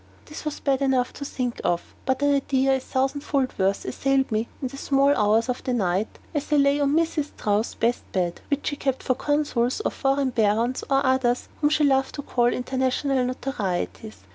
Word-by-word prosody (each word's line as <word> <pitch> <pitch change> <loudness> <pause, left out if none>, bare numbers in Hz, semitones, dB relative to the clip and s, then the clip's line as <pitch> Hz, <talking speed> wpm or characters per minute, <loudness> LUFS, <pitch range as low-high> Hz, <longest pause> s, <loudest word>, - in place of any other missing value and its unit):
This 300 +1 -9
was 305 - -3
bad 275 -1 0
enough 260 -2 +1
to 280 - -7
think 250 -3 -3
of, 175 0 -1
but 265 +2 +1
an 285 0 +4
idea 270 -1 +2
a - - -1
thousandfold 270 +1 -1
worse 195 +1 +1
assailed 270 0 0
me 220 +2 0
in 260 - -3
the 275 - -10
small 275 0 +2
hours 215 +2 +3
of 250 -1 -3
the 255 - -1
night, 190 -1 -1 0.2
as 295 -1 -3
I - - +4
lay 280 0 +4
on 285 0 +2
Mrs. 320 -2 +1
Strouss's 215 -5 -1
best 235 +1 -1
bed, 175 -2 -1
which 285 -1 -1
she 290 - -2
kept 270 -2 -2
for 255 - +2
consuls, 285 - 0
or - - -1
foreign 275 -1 0
barons, 230 +2 +1
or 275 0 +2
others 260 -2 +1
whom 295 - +3
she 305 0 +2
loved 270 -1 +2
to 285 - -5
call 240 -3 +1
"international 260 +1 0
notorieties." 220 -5 -3
265 Hz, 195 wpm, -24 LUFS, 240-280 Hz, 0.2 s, an